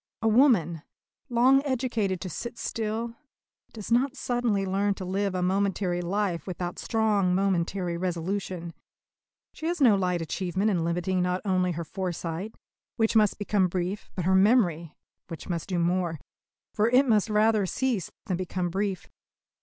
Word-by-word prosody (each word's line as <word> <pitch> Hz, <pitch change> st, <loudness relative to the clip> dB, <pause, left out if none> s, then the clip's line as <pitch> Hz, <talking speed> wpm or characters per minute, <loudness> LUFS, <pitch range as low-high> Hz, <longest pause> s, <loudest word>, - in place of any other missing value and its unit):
A -, -, +3 dB
woman, 215 Hz, -, +4 dB, 0.5 s
long 255 Hz, +3 st, +4 dB
educated 235 Hz, -8 st, -1 dB
to 190 Hz, -, -4 dB
sit 235 Hz, +7 st, -6 dB
still, 225 Hz, +1 st, -3 dB, 0.6 s
does 215 Hz, 0 st, -8 dB
not 260 Hz, +4 st, +2 dB
suddenly 240 Hz, -5 st, 0 dB
learn 195 Hz, +1 st, 0 dB
to 185 Hz, -, -6 dB
live 195 Hz, +1 st, -1 dB
a 180 Hz, -, 0 dB
momentary 190 Hz, -1 st, 0 dB
life 185 Hz, -1 st, -2 dB
without 180 Hz, -1 st, -4 dB
strong 210 Hz, -5 st, +1 dB
momentary 185 Hz, -2 st, 0 dB
resolution. 180 Hz, 0 st, -3 dB, 0.8 s
She 315 Hz, -, -5 dB
has 345 Hz, 0 st, -1 dB
no 240 Hz, -7 st, +6 dB
light 180 Hz, -2 st, 0 dB
achievement 185 Hz, +5 st, -1 dB
in 175 Hz, -4 st, 0 dB
limiting 175 Hz, +2 st, 0 dB
not 180 Hz, +1 st, 0 dB
only 185 Hz, -2 st, +1 dB
her 170 Hz, +1 st, -4 dB
foresight, 180 Hz, +2 st, -4 dB, 0.4 s
which 225 Hz, -1 st, +1 dB
must 215 Hz, -2 st, +4 dB
become 205 Hz, -2 st, +1 dB
brief, 185 Hz, +3 st, -3 dB
but 180 Hz, -, -2 dB
her 190 Hz, -, +3 dB
memory, 190 Hz, -6 st, +3 dB, 0.3 s
which 165 Hz, -2 st, -8 dB
must 170 Hz, 0 st, -3 dB
do 180 Hz, -, -1 dB
more; 175 Hz, -2 st, 0 dB, 0.5 s
for 215 Hz, +2 st, +2 dB
it 260 Hz, +3 st, +4 dB
must 215 Hz, -2 st, +3 dB
rather 215 Hz, -1 st, +3 dB
cease 240 Hz, -4 st, -1 dB, 0.2 s
than 185 Hz, -5 st, -1 dB
become 180 Hz, -1 st, -3 dB
brief. 195 Hz, -1 st, -2 dB
190 Hz, 155 wpm, -27 LUFS, 180-220 Hz, 0.8 s, no